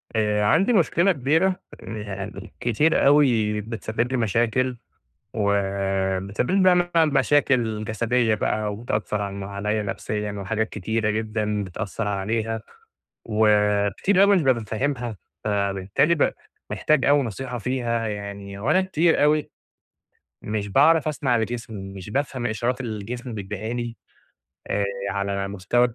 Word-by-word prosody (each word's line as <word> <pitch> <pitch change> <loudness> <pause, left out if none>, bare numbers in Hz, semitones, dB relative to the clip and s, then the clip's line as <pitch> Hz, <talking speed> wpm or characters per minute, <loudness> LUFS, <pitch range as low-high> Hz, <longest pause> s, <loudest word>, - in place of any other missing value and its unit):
آآ، 105 -1 +1
عندي 190 - +3
مشكلة 175 0 +3
كبيرة 160 +6 +1 0.2
يعني، 105 -2 -7
كتير 135 +7 +2
أوي 115 -8 +4
بتسبب 115 +2 -3
لي 130 - +1
مشاكل، 120 +3 +1 0.6
وبتسبب 100 - 0
لي 195 0 +3
بقى 185 -1 +6
مثلًا 175 -2 +3
مشاكل 125 -6 +2
جسديّة 115 +1 +1
بقى، 105 0 -1
وبتأثر 105 -1 -2
عنّ 100 -1 -4
عليّا 105 +2 -2
نفسيّاً، 105 +1 -3
وحاجات 105 +2 -2
كتيرة 110 +2 -1
جدًا 105 -1 -1
بتأثر 100 +3 -4
عليها، 110 +3 -1 0.6
وكتير 105 - +2
أوي - - +7
أنا 200 - +5
مش 180 - +3
بابقى 130 -6 +2
فاهمها، 120 -1 -2 0.3
فبالتالي 100 - +1
ب 145 - +2 0.4
محتاج 155 -3 +1
أوي 145 0 +4
نصيحة 125 +2 -5
فيها 120 -1 -1
يعني، 100 -1 -6
وأنا 180 - +3
كتير 170 -4 +2
أوي 150 0 +2 0.9
مش 105 -1 -3
باعرف 155 +8 +4
اسمع 135 -5 +1
لجسمي، 110 -4 -4
مش 95 +1 -8
بافهم 130 -1 -1
إشارات 120 +4 -1
الجسم 120 +1 -5
بيديها 105 +2 -5
لي 120 -1 -4 0.7
آآ، 100 - 0 0.3
على 100 0 -2
مستوى 100 +6 +1
110 Hz, 125 wpm, -24 LUFS, 105-130 Hz, 0.9 s, أوي